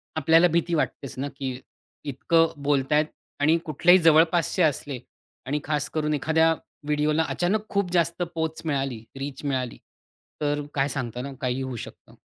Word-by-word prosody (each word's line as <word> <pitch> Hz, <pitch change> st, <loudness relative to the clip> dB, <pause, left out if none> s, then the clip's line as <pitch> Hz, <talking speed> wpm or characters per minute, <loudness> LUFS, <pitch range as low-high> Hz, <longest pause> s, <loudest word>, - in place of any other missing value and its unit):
आपल्याला 165 Hz, +3 st, +5 dB
भीती 170 Hz, 0 st, 0 dB
वाटतेच 140 Hz, -5 st, -2 dB
ना, 140 Hz, -, -1 dB
की 130 Hz, -3 st, -4 dB, 0.5 s
इतकं 165 Hz, +4 st, +2 dB
बोलतायेत 145 Hz, +2 st, +2 dB, 0.3 s
आणि 155 Hz, +3 st, +4 dB
कुठलेही 175 Hz, +4 st, +5 dB
जवळपासचे 165 Hz, +3 st, +4 dB
असले 145 Hz, -3 st, 0 dB, 0.5 s
आणि 145 Hz, +3 st, -1 dB
खास 150 Hz, -1 st, -1 dB
करून 150 Hz, -1 st, -1 dB
एखाद्या 160 Hz, +2 st, +3 dB, 0.3 s
व्हिडिओला 150 Hz, +2 st, +2 dB
अचानक 210 Hz, +5 st, 0 dB
खूप 200 Hz, -3 st, 0 dB
जास्त 170 Hz, 0 st, +1 dB
पोहच 160 Hz, -1 st, -2 dB
मिळाली, 135 Hz, -6 st, -2 dB, 0.2 s
रीच 135 Hz, 0 st, -6 dB
मिळाली. 130 Hz, -3 st, -2 dB, 0.6 s
तर 145 Hz, 0 st, 0 dB
काय 140 Hz, 0 st, +1 dB
सांगता 125 Hz, -4 st, -4 dB
ना, 140 Hz, +2 st, -6 dB
काहीही 125 Hz, +1 st, -1 dB
होऊ 130 Hz, -1 st, -4 dB
शकतं. -, -, -16 dB
150 Hz, 145 wpm, -25 LUFS, 135-165 Hz, 0.6 s, आपल्याला